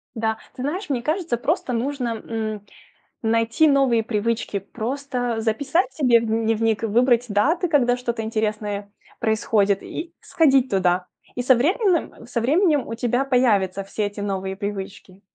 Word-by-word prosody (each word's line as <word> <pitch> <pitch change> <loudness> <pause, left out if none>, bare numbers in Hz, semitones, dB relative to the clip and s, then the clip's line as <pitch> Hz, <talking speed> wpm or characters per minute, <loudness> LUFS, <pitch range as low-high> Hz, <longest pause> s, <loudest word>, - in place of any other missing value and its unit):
Да. 220 -1 -1 0.2
Ты 250 - -7
знаешь, 325 +6 -3
мне 250 -4 0
кажется, 310 -2 -1
просто 250 +1 -1
нужно, 240 -2 -2
м, 215 -2 -4 0.6
найти 230 +6 +2
новые 270 -5 +3
привычки, 220 -1 -1
просто 245 +3 -3
записать 280 - 0
себе 250 -6 +4
в 230 - -3
дневник 225 0 0
и - - +2
выбрать 240 +2 +3
даты, 285 - +2
когда 250 -6 +2
что-то 240 -2 -3
интересное 210 -2 -2 0.3
происходит, 210 -3 +1
и 335 +1 -7
сходить 270 -5 +3
туда. 180 -2 +1 0.3
И 245 - -1
со 255 +1 +5
временэм 340 - 0
со 240 -1 -2
временем 300 - +2
у 230 - -4
тебя 245 +3 0
появятся 205 -8 +2
все 205 +2 -3
эти 205 +1 -6
новые 195 -1 -3
привычки. 195 -1 -6
230 Hz, 150 wpm, -22 LUFS, 210-265 Hz, 0.6 s, со